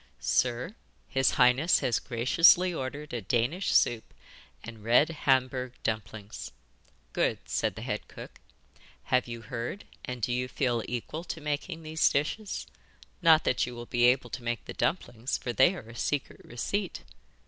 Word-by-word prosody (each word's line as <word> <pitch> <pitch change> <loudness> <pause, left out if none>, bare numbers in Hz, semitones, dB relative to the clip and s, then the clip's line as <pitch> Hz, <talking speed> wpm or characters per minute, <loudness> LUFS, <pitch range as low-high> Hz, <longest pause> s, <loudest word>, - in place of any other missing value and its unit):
'Sir, 125 - 0 0.3
his 135 -1 +2
highness 125 +7 +5
has 120 - +1
graciously 165 +9 +4
ordered 145 0 -5
a 120 - -2
Danish 125 - 0
soup 115 -2 +2 0.5
and 115 -2 -10
red 120 +7 +4
Hamburg 130 -4 +1
dumplings.' 110 -1 -4 0.6
'Good,' - - +1
said - - -1
the - - -7
head - - -4
cook. - - -11 0.6
'Have 125 -1 +1
you 120 -1 -6
heard, 120 - -5 0.2
and 125 -2 -6
do 120 - +1
you 125 +1 -1
feel 125 -3 0
equal 125 +7 -4
to 165 - -5
making 155 +3 -4
these 160 +1 +2
dishes? 180 +9 -2 0.6
Not 160 -2 +6
that 125 - +1
you 125 - -7
will 120 0 -7
be 120 0 +2
able 125 -1 +3
to 130 - -5
make 120 0 -3
the - - -7
dumplings, 120 -8 -1
for 120 - -4
they 130 +10 +5
are 115 - -9
a 115 - -11
secret 145 +3 -2
receipt. 185 - -3
125 Hz, 160 wpm, -29 LUFS, 120-155 Hz, 0.6 s, Not